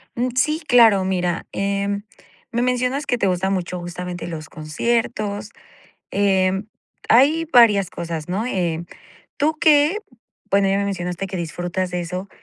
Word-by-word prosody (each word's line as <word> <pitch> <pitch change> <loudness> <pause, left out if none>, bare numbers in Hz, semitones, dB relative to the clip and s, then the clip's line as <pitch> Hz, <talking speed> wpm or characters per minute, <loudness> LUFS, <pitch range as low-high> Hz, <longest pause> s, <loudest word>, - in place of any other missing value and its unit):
Mm, 245 +2 0
sí, 305 +5 +1
claro. 225 -6 +6
Mira, 180 -2 -1
eh, 200 0 -1 0.6
me 235 - 0
mencionas 250 +3 0
que 245 - 0
te 200 - +1
gustan 190 +1 0
mucho 180 -1 -3
justamente 175 0 -6
los 160 -2 -7
conciertos, 210 +5 -2 0.6
em, 195 0 +1 0.4
hay 290 +7 +5
varias 210 -6 +6
cosas, 165 -1 -5
¿no?, 195 +5 -1
eh, 170 -7 -1 0.5
¿tú 310 +2 +1
qué? 305 +3 +4 0.5
Bueno, 200 0 +4
ya 195 - +2
me 200 - 0
mencionaste 180 -1 -3
que 190 -1 -5
disfrutas 175 +2 -3
de 180 - -2
eso. 180 +3 -5
195 Hz, 145 wpm, -21 LUFS, 180-235 Hz, 0.6 s, claro